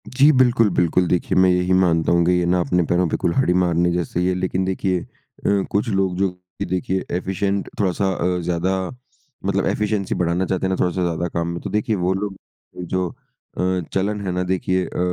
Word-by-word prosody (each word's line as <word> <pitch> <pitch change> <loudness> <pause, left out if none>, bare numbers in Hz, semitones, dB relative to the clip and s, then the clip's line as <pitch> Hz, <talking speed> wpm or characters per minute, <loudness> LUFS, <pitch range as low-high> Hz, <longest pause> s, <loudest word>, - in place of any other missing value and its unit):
जी 140 +4 +5
बिल्कुल, 125 -5 +4
बिल्कुल 90 0 +2
देखिए 90 +1 0
मैं 95 0 +5
यही 90 0 +2
मानता 85 -3 +2
हूँ 85 0 +3
कि 90 - +3
ये 90 -1 +2
ना 90 +1 +2
अपने 90 0 +1
पैरों 90 +2 +1
पे - - -1
कुल्हाड़ी 90 +2 +1
मारने 85 0 +2
जैसा 85 0 -2
ही 90 - +1
है, 95 - +2
लेकिन 95 +1 -1
देखिए 95 -1 0
अ, 100 -1 -3
कुछ 105 +4 0
लोग 95 -3 0
जो 95 0 +2
कि 90 0 -9
देखिए, 95 +1 -1
एफिशिएंट 95 +2 -2
थोड़ा-सा 95 0 +1
अ, 90 0 0
ज्यादा 90 +2 0 0.7
मतलब 100 0 +1
एफिशिएंसी 105 -2 -1
बढ़ाना 90 +1 0
चाहते 95 0 -1
हैं - - +1
ना 95 - +1
थोड़ा-सा 90 +1 0
ज्यादा 85 0 -1
काम 85 0 -2
में 85 0 -3
तो - - -5
देखिए 105 +1 0
वो 90 0 0
लोग 100 +1 -3 0.5
जो 90 0 -1
अ, 90 +2 -4
चलन 100 +2 0
है 95 - -1
ना 90 +1 -1
देखिए 95 0 0
अ, - - -7
90 Hz, 205 wpm, -21 LUFS, 90-95 Hz, 0.7 s, जी